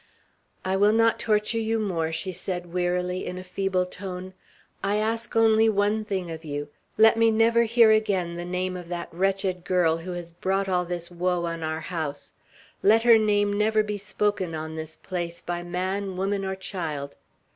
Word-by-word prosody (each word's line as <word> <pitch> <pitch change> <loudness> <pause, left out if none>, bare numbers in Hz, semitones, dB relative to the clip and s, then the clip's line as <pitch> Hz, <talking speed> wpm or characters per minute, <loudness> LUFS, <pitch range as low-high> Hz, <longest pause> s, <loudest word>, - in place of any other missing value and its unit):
"I 190 +1 +1
will 205 +2 +4
not 225 0 +3
torture 215 +1 +1
you 225 0 0
more," 175 -7 -1
she 185 +4 -2
said 175 -1 -5
wearily, 180 0 0
in 180 - -5
a 185 - -6
feeble 185 0 -1
tone. 185 0 -7 0.5
"I 200 +1 +1
ask 225 +2 -2
only 225 0 +5
one 210 +1 +1
thing 190 -4 -3
of 160 0 -7
you; 145 -1 -4 0.3
let 225 +1 +6
me 230 0 +5
never 230 +1 +4
hear 230 -1 +5
again 200 -6 +1
the 175 - -4
name 180 +1 -2
of 180 -1 -7
that 175 0 -5
wretched 190 0 0
girl, 175 -3 +2
who 175 +2 -6
has 175 -1 -6
brought 190 +3 -1
all 180 -1 +1
this 175 0 -5
woe 175 0 0
on 165 -1 -4
our 160 0 -2
house; 155 -5 -5 0.5
let 220 +3 +5
her 230 -2 +7
name 205 -1 +2
never 215 +1 +2
be 210 -1 -4
spoken 200 -4 -1
on 160 0 -5
this 160 0 -6
place 170 -2 -5
by 175 0 -4
man, 185 +2 -3
woman, 195 +1 -1
or 190 0 -2
child. 160 -7 -5
185 Hz, 185 wpm, -26 LUFS, 175-210 Hz, 0.5 s, her